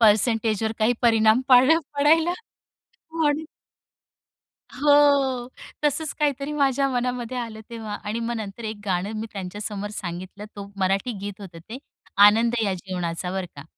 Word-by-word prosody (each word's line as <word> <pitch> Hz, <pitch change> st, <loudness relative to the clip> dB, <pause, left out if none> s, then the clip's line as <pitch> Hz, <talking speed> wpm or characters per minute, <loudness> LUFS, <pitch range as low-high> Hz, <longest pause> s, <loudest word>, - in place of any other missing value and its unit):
परसेंटेजवर 220 Hz, 0 st, +3 dB
काही 220 Hz, +3 st, +3 dB
परिणाम 225 Hz, 0 st, +4 dB
पाड 255 Hz, +4 st, +7 dB, 0.2 s
पडायला 320 Hz, +4 st, +4 dB, 0.8 s
म्हणून 310 Hz, -1 st, +1 dB, 1.3 s
हो. 280 Hz, -4 st, +4 dB, 0.4 s
तसंच 295 Hz, +1 st, 0 dB
काहीतरी 285 Hz, -1 st, 0 dB
माझ्या 275 Hz, -2 st, +2 dB
मनामध्ये 250 Hz, -1 st, -2 dB
आलं 225 Hz, -2 st, -5 dB
तेव्हा 220 Hz, -3 st, -6 dB
आणि 215 Hz, +3 st, -3 dB
मग 235 Hz, +1 st, -2 dB
नंतर 215 Hz, +1 st, -7 dB
एक 215 Hz, 0 st, -4 dB
गाणं 190 Hz, +2 st, -1 dB
मी 220 Hz, -, -4 dB
त्यांच्यासमोर 205 Hz, +1 st, -5 dB
सांगितलं. 185 Hz, +2 st, -6 dB
तो 200 Hz, 0 st, -8 dB
मराठी 195 Hz, +5 st, 0 dB
गीत 205 Hz, +1 st, -7 dB
होतं 180 Hz, -4 st, -10 dB
ते, 245 Hz, +4 st, -6 dB, 0.5 s
"आनंद 230 Hz, +3 st, +4 dB
या 195 Hz, -3 st, 0 dB
जीवनाचा" 180 Hz, -1 st, -4 dB
बरं 190 Hz, -1 st, -3 dB
का. 140 Hz, -, -8 dB
225 Hz, 135 wpm, -24 LUFS, 200-260 Hz, 1.3 s, पाड